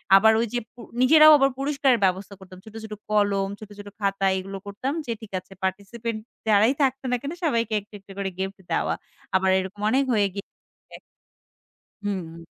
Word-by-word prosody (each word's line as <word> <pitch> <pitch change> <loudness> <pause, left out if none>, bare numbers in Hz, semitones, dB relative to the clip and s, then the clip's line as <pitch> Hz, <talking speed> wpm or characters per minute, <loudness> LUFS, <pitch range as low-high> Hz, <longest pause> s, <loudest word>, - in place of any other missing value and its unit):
আবার 220 +3 +7
ওই 235 - 0
যে 245 - +1
পু 245 - -20 0.2
নিজেরাও 310 +4 +8
আবার 275 -1 +4
পুরস্কারের 275 -3 +2
ব্যবস্থা 190 +2 -1
করতাম। 185 -1 -13
ছোট, 220 0 -13
ছোট 215 -1 -7 0.2
কলম 200 -2 +2
ছোট, 215 - -10
ছোট 205 0 -8
খাতা 195 -1 0
এগুলো 195 +1 -5
করতাম 210 +7 -3
যে 235 - -3
ঠিক 220 - -11
আছে 185 +1 -16
পার্টিসিপেন্ট 215 +4 -3 0.3
যারাই 215 +4 +5
থাকত 270 -1 +1
না - - +3
কেন 280 - -4
সবাইকে 230 -8 +1
একটু 205 +1 -19
একটু 195 0 -16
করে 200 -1 -2
গিফট 190 +1 -4
দেওয়া। - - +1 0.4
আবার 190 0 +3
এরকম 190 +2 -6
অনেক 265 +4 +3
হয়ে 205 -2 +3
গিয়েছে। 200 0 -13 1.1
হুম। 170 -5 -5
205 Hz, 175 wpm, -24 LUFS, 195-240 Hz, 1.1 s, নিজেরাও